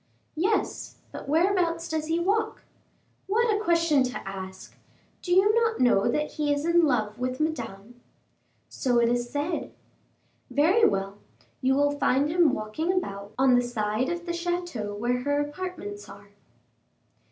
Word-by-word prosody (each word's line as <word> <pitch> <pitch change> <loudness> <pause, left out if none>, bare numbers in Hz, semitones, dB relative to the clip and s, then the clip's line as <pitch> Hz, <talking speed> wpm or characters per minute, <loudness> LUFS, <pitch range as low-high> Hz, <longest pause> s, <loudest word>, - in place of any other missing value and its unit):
"Yes; 390 +7 -1 0.2
but - - -8
whereabouts 335 0 +1
does 315 -1 -2
he 325 +1 +1
walk?" 425 +5 0 0.6
"What 445 +2 +2
a - - -1
question 335 -6 +3
to 250 -5 -6
ask! 190 -1 -8 0.5
Do 355 - -5
you 385 +4 +5
not 460 0 +1
know 240 -6 +4
that 300 0 -1
he 295 -1 -1
is 290 +1 0
in 340 0 +4
love 215 -4 -1
with 255 0 -2
Madame?" 240 -7 -4 0.7
"So 245 -3 0
it 235 0 +3
is 240 0 -1
said." 290 +6 -3 0.8
"Very 360 +11 +4
well; 195 +1 -3 0.4
you 265 +1 +2
will 290 +1 +3
find 285 0 +1
him 335 -2 +4
walking 215 +11 -2
about 200 - -4
on 260 -1 +4
the 245 - +5
side 230 0 -1
of 345 0 -4
the 345 - -3
chateau 340 -12 -3
where 245 +4 -1
her 285 +2 0
apartments 290 - -5
are." 200 +1 -13
290 Hz, 150 wpm, -26 LUFS, 235-345 Hz, 0.8 s, you